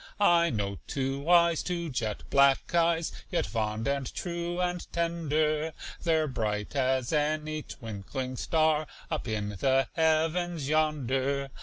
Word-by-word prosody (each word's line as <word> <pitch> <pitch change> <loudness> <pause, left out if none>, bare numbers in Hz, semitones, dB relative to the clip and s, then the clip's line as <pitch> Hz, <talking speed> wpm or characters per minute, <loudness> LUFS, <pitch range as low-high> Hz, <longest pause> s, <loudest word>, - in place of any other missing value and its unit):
I 170 -4 +5
know 100 -3 -2
two 135 +2 -2
eyes 170 -2 +5
two 170 -3 -3
jet 110 -5 -2
black 140 +2 +4
eyes, 170 -1 +2 0.2
Yet 175 - 0
fond 110 0 -2
and 140 -2 -1
true 175 0 -3
and 180 -1 -2
tender; 155 -2 0 0.3
They're 160 -2 +2
bright 105 -3 -2
as 130 0 +1
any 155 +1 0
twinkling 125 +2 -6
star 155 0 +2 0.2
Up 155 -5 -2
in 105 -2 -2
the 130 +6 +1
heavens 160 -1 +1
yonder. 140 -3 0
150 Hz, 130 wpm, -29 LUFS, 130-165 Hz, 0.3 s, I